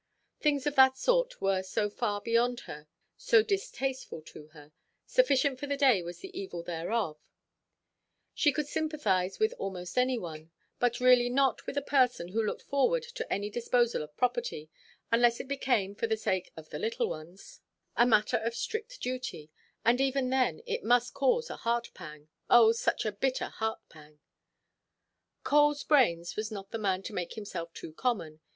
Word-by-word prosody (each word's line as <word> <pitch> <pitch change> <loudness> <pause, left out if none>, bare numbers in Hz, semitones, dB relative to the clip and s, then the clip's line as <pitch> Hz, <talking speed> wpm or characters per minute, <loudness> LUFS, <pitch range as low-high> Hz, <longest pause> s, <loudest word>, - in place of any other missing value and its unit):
Things 285 -3 +1
of 295 - 0
that 265 -1 +6
sort - - +1
were 195 -1 +1
so 205 +3 -1
far 205 -1 -2
beyond 235 +2 +1
her, 150 +1 -10 0.3
so - - +4
distasteful 270 - -3
to 150 -1 -12
her; 150 -1 -16 0.3
sufficient 280 - +2
for 285 - -5
the 280 0 -1
day 260 -9 +4
was 175 +1 -8
the 385 -1 -10
evil 375 - -5
thereof; 170 0 -2 1.1
she 295 - +3
could 300 +2 -2
sympathize 280 - -1
with 435 +2 +2
almost 180 +3 -3
any 255 0 +2
one, 160 -5 -8 0.3
but 245 -1 +1
really 250 -1 +5
not 265 -1 +1
with 280 - -4
a 285 - 0
person 250 -10 +2
who 220 +4 0
looked 210 - -3
forward 455 - +1
to - - -5
any 205 +1 -1
disposal 240 0 +1
of 150 0 -10
property, 250 - -1 0.4
unless 235 0 +4
it - - -6
became, 245 -8 0
for 220 +3 -2
the 220 0 0
sake 185 -4 -2
of 155 -1 -11
the - - -5
little 460 +2 -1
ones, 170 +5 -9 0.3
a - - +5
matter 215 -3 +3
of 230 +1 -3
strict 445 - -4
duty; 250 -12 -5 0.3
and 240 +3 +4
even 270 -1 +1
then 265 - +1
it 475 0 -3
must 245 0 +2
cause 465 - +1
a - - -7
heart–pang—oh, 225 -2 +1
such 230 - -1
a 215 - 0
bitter 255 +6 -1
heart–pang! 155 -9 -6 1.3
"Coleʼs 295 0 +3
brains" 175 - +3
was 215 0 -3
not 200 -2 -7
the 225 - -3
man 190 -2 0
to - - -7
make 180 -1 -4
himself 185 -6 -6
too 155 - -8
common. 165 -8 -2
235 Hz, 170 wpm, -30 LUFS, 190-275 Hz, 1.3 s, that